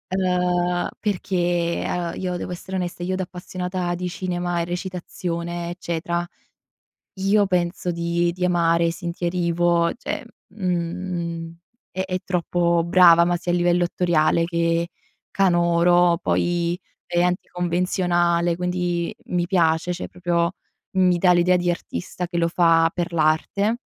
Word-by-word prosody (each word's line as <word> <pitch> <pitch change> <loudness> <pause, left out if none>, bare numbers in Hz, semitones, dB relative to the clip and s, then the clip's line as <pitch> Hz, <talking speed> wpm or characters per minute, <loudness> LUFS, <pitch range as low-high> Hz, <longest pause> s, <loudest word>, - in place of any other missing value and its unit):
uhm, 180 -1 +1
perché, 175 -4 0
uhm, 175 -1 -2
io 180 -1 -2
devo 180 - -5
essere 190 +2 -6
onesta, 175 -1 -4
io 185 +1 -1
da 190 - -1
appassionata 180 0 -4
di 180 +1 -3
cinema 175 -1 -2
e - - -1
recitazione 175 -1 -4
eccetera, 170 0 -3 1.0
io 200 +1 +3
penso 180 -1 -1
di 170 0 0
di 180 +1 -3
amare 170 -1 +3
Cynthia 170 0 -3
Erivo, 170 -1 +1
cioè 250 - -5 0.2
mhmm, 170 -3 -3 0.3
è 190 - -2
è 185 -1 -2
troppo 170 -1 +1
brava, 170 -1 +6
ma 175 0 +1
sia 175 0 -2
a - - +2
livello 175 0 +2
attoriale 170 -2 +2
che 170 0 0 0.4
canoro, 175 -1 +3
poi 175 0 0 0.3
è 175 0 +2
anticonvenzionale, 175 -1 +1
quindi 180 -1 -1
mi 175 -1 -1
piace, 170 -1 +2
cioè 175 - -6
proprio 175 0 0 0.4
mi 180 -1 +4
dà 180 +1 +4
l'idea 180 +1 +4
di 175 0 +1
artista 175 +1 -4
che 175 0 -5
lo 170 0 +2
fa 165 -1 +4
per 175 0 -3
l'arte. 170 +8 +1
175 Hz, 135 wpm, -23 LUFS, 170-180 Hz, 1.0 s, brava